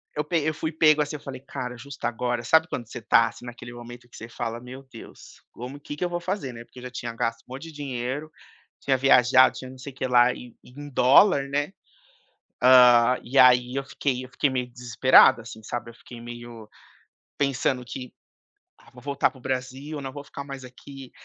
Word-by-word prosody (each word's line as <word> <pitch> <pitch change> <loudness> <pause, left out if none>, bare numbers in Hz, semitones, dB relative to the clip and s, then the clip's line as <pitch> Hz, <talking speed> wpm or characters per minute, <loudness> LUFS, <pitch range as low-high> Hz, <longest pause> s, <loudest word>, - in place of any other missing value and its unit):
eu 150 - -1
pe 165 +2 0
eu 155 +1 0
fui 160 +1 -4
pego 155 -1 +4
assim, 150 +1 -3
eu - - -6
falei: 130 -2 -8
"Cara, 125 -2 -6
justo 135 +2 -9
agora", 120 0 -2
sabe 160 +6 +4
quando 120 -9 -5
você 125 - -8
tá 115 +1 +4
assim 120 - -13
naquele 120 0 -9
momento 120 0 -11
que - - -14
você 115 - -9
fala: 115 -1 -5
"Meu 130 +2 -10
Deus, 115 - -13
como 125 +4 -8
que 145 0 -8
que 180 - -1
eu - - -2
vou 175 0 -3
fazer, 180 -8 -4
né." 115 0 -9
Porque 125 - -15
eu - - -12
já 125 - -7
tinha 120 -1 -6
gasto 115 0 -2
um 125 - -13
monte 135 - -8
de - - -10
dinheiro, 140 +1 -5 0.5
tinha 135 -1 +1
viajado, 130 0 +5
tinha 130 0 -8
não 130 - -13
sei 135 +2 -9
que 130 - -4
lá 125 0 +4
e 125 -2 -12
em 145 +3 -11
dólar, 140 +3 +5
né. 145 +4 -1 0.9
Hã, 125 -1 +7
e 135 +3 -1
aí 125 0 +5
eu 135 - -2
fiquei 130 -2 -3
eu - - -11
fiquei 145 - +1
meio 125 -1 -2
desesperado, 125 0 +5
assim, 110 -1 -11
sabe. 120 +2 -5
Eu - - -16
fiquei 120 - -12
meio 120 -1 -10 0.7
pensando 135 -2 0
que: 125 +1 -8 0.7
"Ah, - - -20
vou 125 - -14
voltar 140 +1 0
para 140 - -17
o - - -19
Brasil, 130 +4 -4
não 135 -1 -6
vou 145 +1 -9
ficar 140 0 -8
mais 135 -1 -8
aqui". 130 +1 -12
130 Hz, 215 wpm, -25 LUFS, 120-140 Hz, 0.9 s, Hã